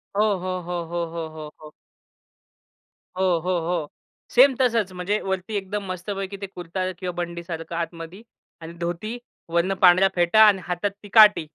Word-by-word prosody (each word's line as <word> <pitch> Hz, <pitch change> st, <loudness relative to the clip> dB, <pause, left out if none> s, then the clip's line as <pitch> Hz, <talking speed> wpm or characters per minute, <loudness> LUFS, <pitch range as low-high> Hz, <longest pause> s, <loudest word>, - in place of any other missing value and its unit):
हो, 210 Hz, -, +2 dB, 0.2 s
हो, 185 Hz, +1 st, -4 dB
हो, 175 Hz, 0 st, -4 dB
हो, 170 Hz, 0 st, -1 dB
हो, 165 Hz, -1 st, -4 dB
हो, 155 Hz, -1 st, -7 dB
हो. 150 Hz, -, -11 dB, 1.5 s
हो, 190 Hz, -, +1 dB
हो, 180 Hz, +1 st, -1 dB
हो. 165 Hz, -2 st, -2 dB, 0.4 s
सेम 265 Hz, +2 st, +6 dB
तसंच, 230 Hz, -6 st, +2 dB
म्हणजे 180 Hz, +4 st, -1 dB
वरती 190 Hz, +3 st, -3 dB
एकदम 200 Hz, +1 st, -4 dB
मस्तपैकी 195 Hz, +2 st, -5 dB
ते 200 Hz, -, -4 dB
कुर्ता 180 Hz, +1 st, -4 dB, 0.2 s
किंवा 180 Hz, -1 st, -2 dB
बंडीसारखं 170 Hz, -1 st, -5 dB
आतमधी 170 Hz, +3 st, -5 dB, 0.4 s
आणि 165 Hz, +1 st, -8 dB
धोती, 175 Hz, +6 st, -3 dB, 0.4 s
वरनं 185 Hz, +3 st, +2 dB
पांढऱ्या 185 Hz, +2 st, +7 dB
फेटा 175 Hz, +5 st, +4 dB
आणि 195 Hz, -3 st, +3 dB
हातात 180 Hz, +3 st, -1 dB
ती 205 Hz, -, -11 dB
काठी. 210 Hz, -6 st, +7 dB
180 Hz, 155 wpm, -24 LUFS, 170-200 Hz, 1.5 s, पांढऱ्या